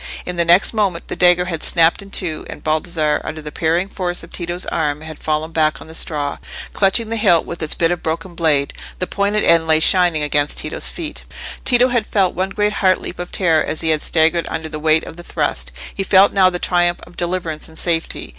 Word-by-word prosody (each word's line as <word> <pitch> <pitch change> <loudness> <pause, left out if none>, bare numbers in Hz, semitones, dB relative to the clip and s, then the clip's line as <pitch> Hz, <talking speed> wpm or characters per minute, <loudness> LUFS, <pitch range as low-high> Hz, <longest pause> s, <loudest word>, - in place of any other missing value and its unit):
In 180 - -4
the 170 - +2
next 175 +6 +4
moment 195 -6 -1
the - - -3
dagger 180 0 +4
had 165 -3 -4
snapped 165 +1 +3
in 200 - -12
two, 170 -5 -1
and - - -9
Baldassarre, 155 -1 0
under 160 - -6
the 150 -1 -8
parrying 170 +5 0
force 180 -3 -3
of - - -13
Tito's 175 0 -4
arm, 150 -2 -2
had 160 -1 -9
fallen 155 +1 -2
back 155 -1 +1
on - - -11
the 160 - -12
straw, 145 -3 0 0.3
clutching 210 +3 +2
the 230 - -2
hilt 170 -6 +3
with 170 - -7
its 155 - +1
bit 165 0 +1
of 175 - -2
broken 165 +3 -4
blade. 155 -4 +1 0.2
The 185 - -2
pointed 200 +3 0
end 165 -1 +3
lay 155 -1 +4
shining 175 -2 +3
against 145 0 0
Tito's - - -1
feet. 320 -4 -7 0.4
Tito 250 0 +4
had 240 -3 0
felt 195 -3 +1
one 185 +2 -2
great 210 +1 0
heart 185 -3 +2
leap 175 - -7
of 175 - -6
terror 165 -5 +2
as 155 - -4
he 165 - -1
had 155 -1 +2
staggered 165 +1 +2
under 160 -1 -4
the 155 - -6
weight 155 +1 +2
of 165 - -10
the 175 - -10
thrust: - - -2 0.2
he - - -4
felt 195 +1 +4
now 190 -2 +5
the 180 - -3
triumph 175 -1 +1
of 175 - -15
deliverance 175 -3 -3
and 160 - -15
safety. 165 -1 -1
170 Hz, 230 wpm, -18 LUFS, 160-185 Hz, 0.4 s, now